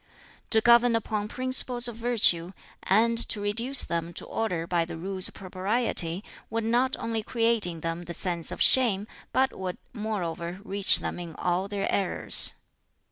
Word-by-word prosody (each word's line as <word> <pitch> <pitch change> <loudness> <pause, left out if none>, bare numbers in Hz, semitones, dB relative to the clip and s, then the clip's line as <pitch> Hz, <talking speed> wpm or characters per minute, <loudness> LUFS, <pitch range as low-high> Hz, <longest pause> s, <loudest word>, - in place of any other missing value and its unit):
"To 220 - +3
govern 235 0 +4
upon 215 -2 -3
principles 255 0 +1
of 240 - -7
virtue, 220 -7 +4 0.3
and 230 +4 +2
to 210 - 0
reduce 230 +6 +3
them 170 0 -4
to - - -6
order 180 -7 -3
by 170 -1 0
the 165 0 -8
Rules 185 +2 +1
of - - -11
Propriety, 190 -1 -1 0.3
would 225 +1 -3
not 245 +4 +1
only 225 -1 -3
create 230 -2 0
in 165 -2 -7
them 165 +2 -5
the 170 0 -7
sense 170 -3 -3
of - - 0
shame, 220 -6 +4 0.3
but 265 0 +1
would 185 -1 -5 0.2
moreover 180 -6 -5
reach 200 -1 +3
them - - -5
in 170 -3 -8
all 180 +2 -2
their 200 -1 -3
errors. 195 -2 +1
205 Hz, 165 wpm, -26 LUFS, 175-230 Hz, 0.3 s, govern